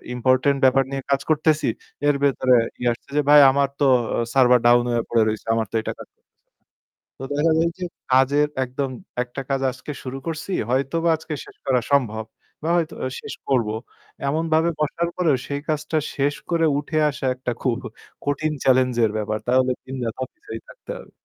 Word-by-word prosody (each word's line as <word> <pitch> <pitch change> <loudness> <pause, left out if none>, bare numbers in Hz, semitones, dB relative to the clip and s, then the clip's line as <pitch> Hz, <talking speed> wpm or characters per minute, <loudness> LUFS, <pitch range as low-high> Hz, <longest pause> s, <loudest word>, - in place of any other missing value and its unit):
important 130 +3 +2
ব্যাপার 135 +1 +5
নিয়ে 135 -1 -3
কাজ 140 0 +2
করতেছি, 155 0 +2 0.4
এর 145 - +4
ভেতরে 130 -2 +3 0.2
ইয়ে 120 0 +1
আসছে 120 - -17
যে, - - +5
"ভাই, 150 0 +9
আমার 140 0 +1
তো 140 - +5 0.3
অ - - 0
server 125 -2 +5
down 120 0 +6
হয়ে 120 -1 +1
পড়ে 115 -2 +3
রইছে। 110 0 -3
আমার 110 -2 -1
তো - - -5
এটা - - -4
কাজ - - -9 1.1
তো - - -7
দেখা 160 +2 +2
যায় 165 +1 +3
যে 180 - -2 0.3
কাজের 140 +3 +4 0.2
একদম 130 +2 -3 0.3
একটা 125 +2 -7
কাজ 135 -1 0
আজকে 125 +3 -8
শুরু 130 +1 -5
করছি, 160 +4 -4 0.2
হয়তোবা 140 +6 +1
আজকে 160 0 -7
শেষ - - -15
করা 125 -2 +3
সম্ভব 110 -6 +2 0.4
বা 160 - -1
হয়তো 165 -2 -1 0.3
শেষ - - -7 0.2
করবো। 115 -5 +1 0.5
এমনভাবে 160 +2 +1
বসার 170 +3 0
পরেও 160 -7 +3
সেই 140 0 -3
কাজটা 155 +1 -1 0.2
শেষ 145 +1 +1 0.2
করে 165 -1 +3
উঠে 155 +1 -2
আসা 140 - -5
একটা 125 -1 -3
খুব 125 -2 +1 0.5
কঠিন 150 +2 0
চ্যালেঞ্জের 125 -4 +3
ব্যাপার। 110 0 -2
তাহলে 130 +1 +3
দিন 130 +1 -6
রাত 115 0 -4
অফিসেই 115 -3 -10
থাকতে - - -10
হবে। - - -14
135 Hz, 180 wpm, -22 LUFS, 125-150 Hz, 1.1 s, ভাই